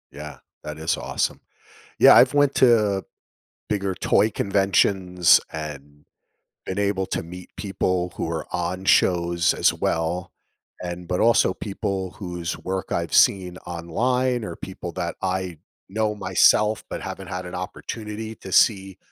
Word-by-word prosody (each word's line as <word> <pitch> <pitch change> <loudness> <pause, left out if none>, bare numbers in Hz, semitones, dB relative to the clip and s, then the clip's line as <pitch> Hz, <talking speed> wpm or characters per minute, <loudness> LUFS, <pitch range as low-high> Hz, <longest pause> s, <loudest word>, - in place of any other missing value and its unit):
Yeah, 75 +1 -9 0.2
that 75 0 -6
is 80 +1 -1
awesome. - - -2 0.6
Yeah, - - +8
I've - - +6
went 145 -1 +3
to 105 -6 +3 0.7
bigger 100 -2 -1
toy 105 +4 +2
conventions 95 -4 +3
and 75 -1 -8 0.6
been 95 - -4
able 100 -1 0
to - - -3
meet 90 +2 -10
people 90 -3 -2
who - - -2
are 80 -1 -3
on 90 +1 -3
shows, 85 -3 +3
as - - +2
well, 85 +2 -2 0.5
and 90 0 -6
but, 90 0 -1
also, 115 -5 +4
people 95 -2 -4
whose 90 -4 -5
work 95 0 -4
I've - - -2
seen 90 -2 +3
online 120 +9 -1
or 85 -5 -6
people 95 -2 -7
that 85 -1 -3
I 95 -2 -2 0.3
know 105 +2 0
myself, 105 +2 +3
but - - -5
haven't - - -7
had 90 +1 -5
an 90 - -7
opportunity 105 +4 -6
to 95 - -11
see 95 -1 +3
95 Hz, 140 wpm, -23 LUFS, 85-100 Hz, 0.7 s, Yeah